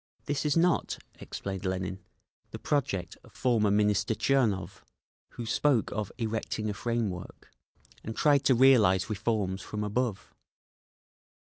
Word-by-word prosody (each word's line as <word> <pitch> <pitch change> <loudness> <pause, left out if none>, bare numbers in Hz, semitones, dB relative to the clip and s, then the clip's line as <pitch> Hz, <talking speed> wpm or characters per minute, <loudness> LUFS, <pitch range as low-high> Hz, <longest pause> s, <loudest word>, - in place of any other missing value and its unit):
"This 145 0 -1
is 150 - +2
not," 175 0 +2 0.2
explained 95 -1 -6
Lenin, 95 0 -3 0.5
"the - - -7
project 110 -11 -2
of - - -18
former 115 -5 +2
Minister 105 +1 +2
Tchernov, 115 -7 0 0.5
who 120 - -6
spoke 125 +1 +1
of 105 -1 -3
'erecting 110 -2 -2
a - - -4
frame 115 -1 -1
work' 90 0 -10 0.5
and 110 - -5
tried 145 -2 +3
to 130 - +5
realise 110 -7 +5
reforms 105 -3 -1
from 105 0 -4
above. 105 0 -2
110 Hz, 130 wpm, -29 LUFS, 100-125 Hz, 0.5 s, to